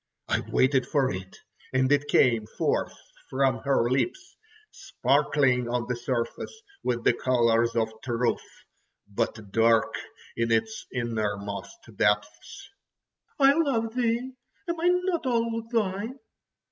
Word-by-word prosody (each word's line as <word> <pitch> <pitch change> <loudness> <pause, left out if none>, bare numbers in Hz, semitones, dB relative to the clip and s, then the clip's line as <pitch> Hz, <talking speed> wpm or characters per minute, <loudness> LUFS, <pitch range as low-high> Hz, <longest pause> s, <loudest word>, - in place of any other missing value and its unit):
I - - +1
waited 130 -1 +3
for 140 -3 +1
it—and 130 +7 -4
it 145 0 +3
came 115 -6 +3
forth - - -1 0.3
from 135 0 +1
her 135 -4 +1
lips, 365 - -1 0.4
sparkling 125 -5 +1
on 120 -1 -1
the 125 - -1
surface 120 - -3 0.2
with 120 -1 -1
the - - +4
colours 115 -2 +2
of 115 -1 +2 0.2
truth, 120 -1 0 0.7
but 105 0 -3
dark 115 0 +3 0.4
in 115 0 0
its 220 - 0
innermost 105 -4 -4
depths: 105 0 -1 0.7
"I 275 -1 +6
love 255 -8 0
thee! 245 +1 0 0.3
Am 340 - -1 0.3
not 340 -7 -1
I - - +2
all 230 -1 -1
thine?" 220 +2 -1
130 Hz, 120 wpm, -27 LUFS, -, 0.7 s, I